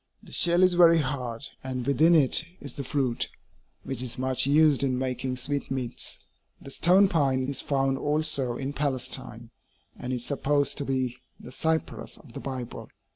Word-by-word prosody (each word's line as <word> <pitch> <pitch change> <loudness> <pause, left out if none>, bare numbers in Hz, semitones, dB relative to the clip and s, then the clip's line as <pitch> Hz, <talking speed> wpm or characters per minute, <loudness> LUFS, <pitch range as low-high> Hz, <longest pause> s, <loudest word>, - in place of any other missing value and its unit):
The - - -15
shell 175 +1 +2
is 185 -1 +5
very 170 -1 +6
hard, 130 -4 -3 0.2
and 130 -2 -4
within 155 +5 +4
it 150 0 +3 0.2
is 140 -3 -5
the 140 - -4
fruit, 130 -2 -1 0.5
which 135 -3 -4
is 125 -2 -4
much 130 +1 +1
used 150 -1 +5
in 130 -2 +1
making 130 0 -2
sweetmeats. 135 -2 -1 0.4
The 135 - -10
stone 185 +7 +5
pine 135 -7 +1
is 135 0 -1
found 135 -1 0
also 145 -4 0
in 135 +1 -4
Palestine, 140 -4 -2 0.4
and 125 - -6
is 125 -2 -2
supposed 145 0 0
to 140 - -3
be 130 -2 -1 0.2
the 125 - -11
cypress 160 +4 -2
of 130 -6 -16
the - - -6
Bible. 130 -3 -6
135 Hz, 165 wpm, -27 LUFS, 130-150 Hz, 0.5 s, very